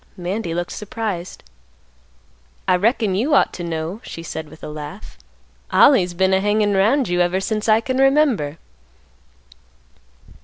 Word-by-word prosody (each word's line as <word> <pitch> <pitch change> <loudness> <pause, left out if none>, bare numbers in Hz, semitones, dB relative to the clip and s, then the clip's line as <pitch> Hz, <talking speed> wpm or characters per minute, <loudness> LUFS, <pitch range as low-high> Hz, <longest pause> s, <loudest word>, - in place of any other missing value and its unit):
Mandy 180 -1 -3
looked 175 0 -3
surprised. 210 -4 -5 1.2
"I 185 - +4
reckon 215 +1 +1
you 255 +10 +1
ought - - +3
to 175 - -6
know," 165 +5 -4
she 165 - -8
said 160 -2 -6
with 160 - -16
a - - -5
laugh; 150 +7 -9 0.6
"Ollie's 185 -11 +5
been 190 +1 +2
a 190 - +3
hangin' 205 0 +1
'round 220 +8 +2
you 175 0 +1
ever 175 +2 +1
since 215 +3 -2
I 215 +1 +5
can 260 +2 -2
remember." 270 - +2
190 Hz, 145 wpm, -20 LUFS, 175-220 Hz, 1.2 s, Ollie's